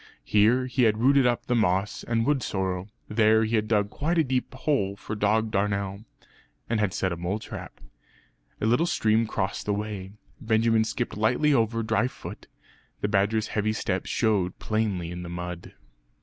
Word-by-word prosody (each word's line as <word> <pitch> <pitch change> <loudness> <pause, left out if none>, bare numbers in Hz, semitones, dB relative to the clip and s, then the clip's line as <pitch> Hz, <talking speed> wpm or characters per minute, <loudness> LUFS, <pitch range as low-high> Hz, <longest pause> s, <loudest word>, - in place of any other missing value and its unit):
Here 115 +5 +3
he 130 -1 +2
had 110 -1 +3
rooted 135 +2 +4
up 120 +1 0
the 125 - 0
moss 100 -3 +1
and 115 -1 0
wood 145 -1 +2
sorrel. 95 -1 -2 0.2
There 110 0 +4
he 110 +1 0
had 110 -1 +1
dug 105 -2 +1
quite 165 +4 -1
a 160 - +5
deep 130 -2 -1
hole 130 -8 0
for 105 - -7
dog 110 +1 +1
darnel; 100 0 -1 0.6
and 115 -2 0
had 105 -3 +1
set 95 0 -1
a - - -1
mole 90 +4 -2
trap. 110 - -9 0.8
A - - -1
little 120 +10 +3
stream 110 -7 +2
crossed 100 -2 -3
the 105 - +1
way. 100 -2 -5 0.3
Benjamin 110 -1 +2
skipped 120 +2 -3
lightly 125 +8 +2
over 115 -2 +1
dry 110 +2 +1
foot; - - -10 0.5
the - - +1
badger's 105 +2 +1
heavy 110 0 0
steps 95 -3 -2
showed 100 -5 +1
plainly 105 -6 -1
in 90 0 -6
the 85 - -7
mud. 90 0 -6
110 Hz, 175 wpm, -26 LUFS, 100-115 Hz, 0.8 s, a